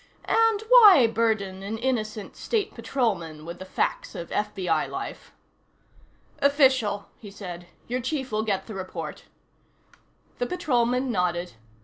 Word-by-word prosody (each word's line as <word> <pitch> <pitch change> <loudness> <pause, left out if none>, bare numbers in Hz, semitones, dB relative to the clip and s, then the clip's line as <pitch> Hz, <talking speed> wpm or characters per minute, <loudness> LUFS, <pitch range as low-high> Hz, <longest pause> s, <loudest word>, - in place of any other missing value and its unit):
And 450 -2 +3
why 420 - +9
burden 220 -4 0
an 205 +3 -4
innocent 220 -4 -2
State 430 -3 -2
Patrolman 170 - -2
with 170 +1 -7
the 185 - -7
facts - - -2
of 170 - -7
FBI 190 -6 -1
life? - - -7 1.1
"Official," 260 -8 +3
he 210 - -10
said. 180 -4 -8 0.2
"Your 250 +2 -2
chief 265 0 -3
will 215 0 0
get 200 -3 -1
the 220 - -8
report." 190 -1 -6 1.1
The 245 - 0
Patrolman 255 -6 0
nodded. 180 - -1
220 Hz, 125 wpm, -26 LUFS, 190-260 Hz, 1.1 s, why